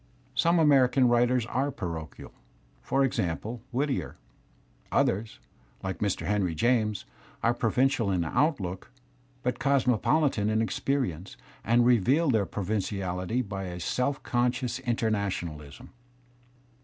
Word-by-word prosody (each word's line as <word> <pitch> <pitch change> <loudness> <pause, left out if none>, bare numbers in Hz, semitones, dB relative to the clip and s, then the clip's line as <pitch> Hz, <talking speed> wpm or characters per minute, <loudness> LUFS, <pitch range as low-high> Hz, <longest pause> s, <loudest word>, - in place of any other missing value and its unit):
Some 170 +1 +3
American 135 -5 +4
writers 120 0 +3
are 135 +4 -1
parochial, 85 - -7 0.5
for 135 - +1
example, 110 -1 -2
\Whittier. 135 +2 -1 0.8
Others, 105 +4 0 0.5
like 95 -1 -4
Mr. 100 -5 -1
Heniy 95 -3 0
James, 110 +2 +1 0.4
are 115 - +3
provincial 120 -1 +1
in 90 -3 0
outlook, 95 - -1 0.5
but 125 - -1
cosmopolitan 130 -2 +2
in 110 0 +1
experience, 115 - -2 0.3
and 120 +2 +3
reveal 130 - +3
their 105 -5 +1
provinciality 100 +2 -2
by 95 -1 -4
a 90 -1 -6
self 125 +10 -1
conscious 125 0 0
internationalism. 100 - -3
115 Hz, 105 wpm, -28 LUFS, 95-130 Hz, 0.8 s, American